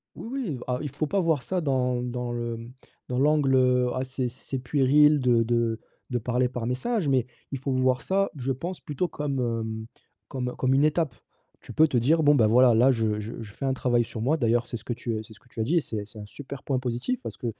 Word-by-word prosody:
Oui, - - -8
oui, 245 - -3
ah, 125 0 -1
il 145 - -4
faut 145 +3 -2
pas 195 +7 +1
voir 160 -6 +1
ça 180 +8 -2
dans 125 -3 0
dans 125 0 -3
le, 120 -1 -3
mmh, 115 +2 -10 0.4
dans 125 - -2
l'angle, 145 -1 +3
heu, 125 -1 +3
ah 130 - -1
c'est 130 -1 -2
c'est 130 +2 -6
puéril 145 +3 +4
de 120 -2 +3
de 115 -1 0 0.3
de 125 - 0
parler 125 +2 0
par 125 -3 -4
message, 160 - -1
mais, 130 -3 +2 0.3
il 135 - -2
faut 135 +1 -2
voir 130 0 +2
ça, 195 +1 +1
je 135 0 -1
pense 170 +8 -6
plutôt 150 +3 -2
comme, 145 -4 -3 0.2
mmh, 110 0 -5 0.4
comme 125 -3 -3
comme 130 +1 +1
une 140 - +4
étape. 155 -3 +1 0.5
Tu - - -10
peux 160 +1 +5
te 135 - -1
dire: 150 +8 +3
«Bon, 145 0 +6
ben, 115 -6 +4
voilà, 120 +2 +5
là 125 +4 +5
je 110 -3 0
je 110 +2 -6
je 105 -2 -9
fais - - -6
un 135 - +2
travail 120 -2 +1
sur 110 - -7
moi», 140 +8 +2
d'ailleurs 120 -2 +1
c'est 120 - -5
ce - - -11
que - - -3
tu 115 -2 -3
c'est 110 - -14
ce 105 - -16
que 125 - -26
tu 115 - -8
as - - +3
dit 155 +10 +1
et - - +5
c'est 115 - -5
et 105 -1 -4
c'est 110 +1 -13
un 105 - -8
super 140 +4 -9
point 135 -2 0
positif, 130 - -2
parce - - -7
que 125 - -5
130 Hz, 260 wpm, -26 LUFS, 120-145 Hz, 0.5 s, Bon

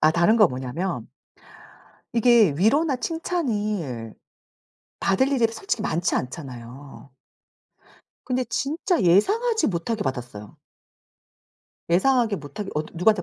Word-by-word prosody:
아 155 - +5
다른 170 +7 +3
거 210 -5 +6
뭐냐면 130 +9 -4 1.1
이게 230 - +5
위로나 275 - +3
칭찬을 210 - -3 0.8
받을 230 +8 +2
일이 255 -5 +3
솔직히 390 - -3
많지 175 -4 0
않잖아요. 130 0 -8 1.2
근데 255 0 0
진짜 315 - -1
예상하지 430 - +3
못하게 205 +5 -2
받았어요. 120 -6 -6 1.3
예상하게 225 +3 +3
못하게 165 +6 -7
어 150 - +1
누구한테 180 +2 +3
200 Hz, 250 characters per minute, -24 LUFS, -, 1.3 s, 거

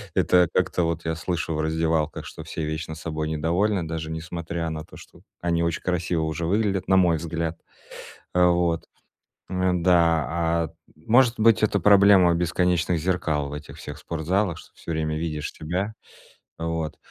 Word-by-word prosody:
Это 90 -2 +4
как-то 90 -1 +1
вот 85 0 -2
я 80 0 -1
слышу 85 0 -2
в 75 - -1
раздевалках, 80 0 0
что - - -9
все 80 - -5
вечно 80 +1 -4
собой 80 -1 -4
недовольны, 85 +4 0
даже 80 0 -4
несмотря 85 0 -4
на 80 -1 -5
то, - - -14
что - - -15 0.2
они 85 -1 +1
очень 85 -1 -1
красиво 85 -2 0
уже 80 +1 -2
выглядят, 100 0 0
на 95 - +5
мой 90 -3 +4
взгляд. 85 0 -3 0.8
Э, 90 0 +5
вот. 85 -2 +1 0.6
Э, 95 0 +1
да, 85 -2 +3
а, 85 0 0 0.3
может 115 +9 +4
быть, 115 0 +5
это 105 -1 +2
проблема 100 -2 +6
бесконечных 90 0 +1
зеркал 80 -5 0
в - - -6
этих 75 0 -9
всех 75 0 -8
спортзалах, 85 +4 -1
что - - -15
всё 85 - -6
время 80 -1 -1
видишь 75 -2 -3
себя. 90 +7 -3 0.7
Вот. 80 -2 -3
85 Hz, 160 wpm, -24 LUFS, 80-90 Hz, 0.8 s, проблема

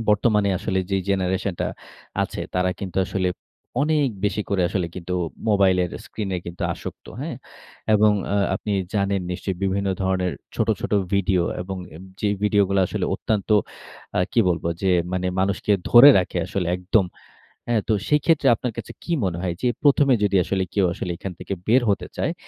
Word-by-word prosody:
বর্তমানে 105 -1 +3
আসলে 95 -3 -1
যেই 95 -1 +1
জেনারেশন 95 0 0
টা - - 0 0.5
আছে, - - -4
তারা 90 0 +2
কিন্তু 95 -2 -6
আসলে 95 -1 -1 0.5
অনেক 150 -3 +2 0.2
বেশি 105 +1 0
করে 95 -3 +2
আসলে 95 -3 -1
কিন্তু 90 0 -4 0.3
মোবাইলের 95 -3 +3 0.2
স্ক্রিনে 95 -4 -3
কিন্তু 85 +1 -6
আসক্ত, - - -9
হ্যাঁ? - - -4 0.6
এবং 105 0 +5 0.2
আ - - +2 0.2
আপনি 105 - -3 0.2
জানেন 100 -1 +1
নিশ্চয়ই 95 +1 -3
বিভিন্ন 100 +1 0
ধরনের 95 -1 0 0.2
ছোট, - - 0
ছোট - - -4 0.2
ভিডিও 95 -2 +2 0.2
এবং 95 +1 -5 0.2
এ - - -9 0.2
যেই 105 -1 +1
ভিডিও 105 -1 +4
গুলো 100 -1 +2
আসলে - - -2
অত্যন্ত 105 -2 -2 0.7
আ - - +4
কি 115 - +4
বলব 85 -1 -1 0.2
যে 95 - +2 0.2
মানে 90 0 -1
মানুষকে 100 +2 +1 0.2
ধরে 125 +4 +10
রাখে 90 -1 -1
আসলে 95 -2 -2
একদম, 95 +2 +2 0.6
হ্যাঁ? 115 -2 +2
তো - - +3 0.2
সেক্ষেত্রে 150 0 +3
আপনার 120 +1 -4
কাছে - - -6
কি 170 - -3
মনে 85 -2 -1
হয়? 90 -2 -1
যে 125 - +3
প্রথমে 140 -2 +5
যদি 100 -1 +2
আসলে 95 -1 0
কেউ 100 -3 +3
আসলে 90 - -4
এখান 95 +1 -6
থেকে - - -6
বের 120 +3 +4
হতে 100 - -1
চায় - - 0
100 Hz, 175 wpm, -23 LUFS, 95-105 Hz, 0.7 s, ধরে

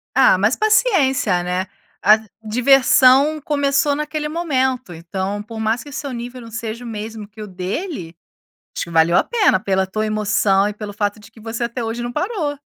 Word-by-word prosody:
Ah, 260 -7 +6
mas 205 +6 +2
paciência 285 - +2
né? 180 +1 -2 0.4
A 210 +2 +7 0.3
diversão 265 +5 +4
começou 285 0 +1
naquele 300 0 -3
momento, 265 - -1
então 190 +5 -4
por 225 +1 -9
mais 220 +2 0
que 290 - -12
seu 280 0 -5
nível 245 +1 -7
não 230 -1 -11
seja 230 +1 -6
o - - -7
mesmo 220 -1 -6
que 215 +1 -12
o - - -6
dele, 185 - -5 0.6
acho - - -2
que - - -12
valeu 165 +1 +3
a - - +5
pena 435 - +2
pela 190 -2 0
tua 215 +3 -2
emoção 210 -2 +2
e 210 - -3
pelo 210 0 -7
fato 205 0 -1
de 220 +2 -16
que 225 - -17
você 225 +2 -4
até 235 +1 -3
hoje 225 +1 -3
não 240 - -4
parou. 325 - -2
230 Hz, 190 wpm, -19 LUFS, 205-275 Hz, 0.6 s, A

